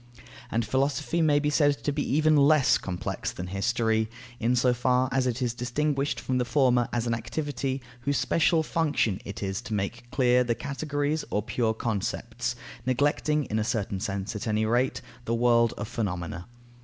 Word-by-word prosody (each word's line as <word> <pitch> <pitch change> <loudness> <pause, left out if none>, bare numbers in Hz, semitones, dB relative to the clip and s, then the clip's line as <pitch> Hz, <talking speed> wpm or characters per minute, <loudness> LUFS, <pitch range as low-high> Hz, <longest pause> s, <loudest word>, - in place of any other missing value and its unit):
And 115 -1 0
Philosophy 140 +7 0
may 150 -2 +4
be 145 0 +1
said 145 -2 +2
to 145 - +1
be 145 +1 -2
even 155 0 +4
less 145 -1 +5
complex 90 -2 -4
than 90 - -6
History, 110 +3 0 0.3
in 120 +2 +2
so 125 0 +3
far 125 +1 +2
as 130 -1 +1
it 125 +1 -1
is 120 -2 0
distinguished 140 +4 -1
from 130 -1 -1
the - - +2
former 125 -2 +3
as 120 -1 -1
an 120 - 0
activity 130 +3 -3 0.2
whose 140 +3 0
special 165 0 +2
function 150 - 0
it 100 - -6
is 95 +2 -2
to 115 -3 -4
make 100 +4 -4
clear 125 -1 +3
the 120 -1 0
categories 145 +2 -2
or 105 - 0
pure 110 0 0
concepts, 110 -3 -2 0.3
neglecting, 145 +4 +1
in 110 -1 -1
a - - +1
certain 105 -4 -2
sense 100 +2 -3
at 105 - -4
any 110 0 +1
rate, 120 +4 +1 0.2
the 115 - 0
world 115 -1 +4
of 105 - -4
phenomena. 90 -4 -4
125 Hz, 180 wpm, -27 LUFS, 110-145 Hz, 0.3 s, less